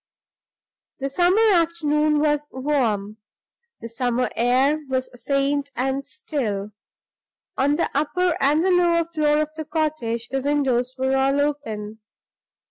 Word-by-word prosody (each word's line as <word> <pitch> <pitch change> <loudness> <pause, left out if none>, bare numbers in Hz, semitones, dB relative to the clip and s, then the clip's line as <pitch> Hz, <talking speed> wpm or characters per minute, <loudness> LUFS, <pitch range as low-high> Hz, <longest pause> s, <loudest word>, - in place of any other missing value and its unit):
The 275 0 -2
summer 360 +9 +3
afternoon 305 -3 +2
was 295 -1 +1
warm; 235 -7 -1 0.6
the - - -6
summer 245 +1 -1
air 260 +6 +2
was 260 -1 -2 0.2
faint 280 0 +1
and 265 +3 -1
still. 225 -9 -4 0.8
On 285 +2 +2
the 335 - 0
upper 345 +4 +1
and 300 +5 +3
the 380 - +3
lower 345 -2 +3
floor 305 -3 +1
of 305 0 -9
the 315 0 -6
cottage 295 -7 -2
the 270 0 -2
windows 260 -3 0
were 265 +1 +1
all 270 +1 +2
open. 220 -8 -3
285 Hz, 130 wpm, -23 LUFS, 255-305 Hz, 0.8 s, summer